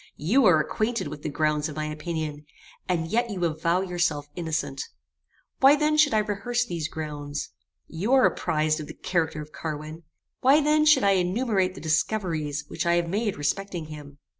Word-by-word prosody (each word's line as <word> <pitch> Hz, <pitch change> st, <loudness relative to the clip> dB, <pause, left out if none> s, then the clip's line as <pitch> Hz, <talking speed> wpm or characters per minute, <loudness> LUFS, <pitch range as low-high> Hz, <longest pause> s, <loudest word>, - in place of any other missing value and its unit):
You 225 Hz, -, +3 dB
are 160 Hz, -4 st, +6 dB
acquainted 215 Hz, +4 st, -1 dB
with 150 Hz, 0 st, -8 dB
the -, -, -3 dB
grounds 150 Hz, 0 st, 0 dB
of 150 Hz, -, -8 dB
my 155 Hz, 0 st, -2 dB
opinion, 155 Hz, -1 st, -4 dB, 0.4 s
and 165 Hz, -3 st, 0 dB
yet 235 Hz, +6 st, 0 dB
you 185 Hz, -4 st, -1 dB
avow 170 Hz, +3 st, +1 dB
yourself 175 Hz, -6 st, -1 dB
innocent: 160 Hz, -5 st, -3 dB, 0.8 s
Why 270 Hz, +2 st, +7 dB
then 300 Hz, +1 st, +1 dB
should 300 Hz, -5 st, +4 dB
I 215 Hz, -1 st, +2 dB
rehearse 240 Hz, +4 st, -1 dB
these 170 Hz, -7 st, -3 dB
grounds? 150 Hz, -2 st, -5 dB, 0.4 s
You 185 Hz, +9 st, -3 dB
are 265 Hz, -1 st, +6 dB
apprized 155 Hz, -2 st, +1 dB
of 150 Hz, -, -6 dB
the -, -, -9 dB
character 160 Hz, -4 st, -1 dB
of 150 Hz, -, -16 dB
Carwin: 155 Hz, +1 st, -6 dB, 0.4 s
Why 275 Hz, +4 st, +5 dB
then 305 Hz, 0 st, +3 dB
should 300 Hz, -, +6 dB
I 200 Hz, -, +5 dB
enumerate 190 Hz, 0 st, +1 dB
the -, -, -9 dB
discoveries 160 Hz, -3 st, -1 dB
which -, -, -3 dB
I 170 Hz, -, +4 dB
have 170 Hz, -1 st, 0 dB
made 205 Hz, +2 st, -1 dB
respecting 170 Hz, +2 st, -2 dB
him? 145 Hz, -2 st, -11 dB
170 Hz, 180 wpm, -26 LUFS, 155-210 Hz, 0.8 s, Why